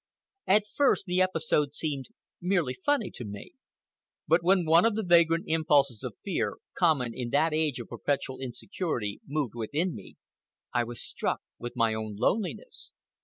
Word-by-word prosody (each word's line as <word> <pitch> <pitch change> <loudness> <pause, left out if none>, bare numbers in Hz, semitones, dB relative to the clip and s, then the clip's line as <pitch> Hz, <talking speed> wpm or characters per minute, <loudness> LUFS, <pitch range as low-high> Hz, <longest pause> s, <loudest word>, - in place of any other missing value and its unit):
At 205 +2 +5
first 270 -2 +2
the 180 0 +1
episode 160 -5 +1
seemed 140 -5 -2 0.3
merely 175 -7 +1
funny 230 - 0
to - - -7
me. 105 -2 -8 0.8
But 165 +2 +4
when 180 0 +3
one 165 +2 +6
of 230 -2 +3
the 220 - -1
vagrant 170 -2 +4
impulses 145 -7 +2
of - - -6
fear, - - -1 0.2
common 140 -9 +2
in 120 0 -4
that 150 +4 +2
age 155 -4 0
of 120 - -8
perpetual 135 -2 -2
insecurity, 125 - -4
moved 145 -5 -1
within 145 +10 -1
me, 100 - -11 0.6
I 120 -1 +2
was 120 0 -6
struck - - -2 0.2
with 120 +1 -6
my 115 -2 +2
own 110 -1 -4
loneliness. 200 - -2
155 Hz, 160 wpm, -28 LUFS, 120-180 Hz, 0.8 s, one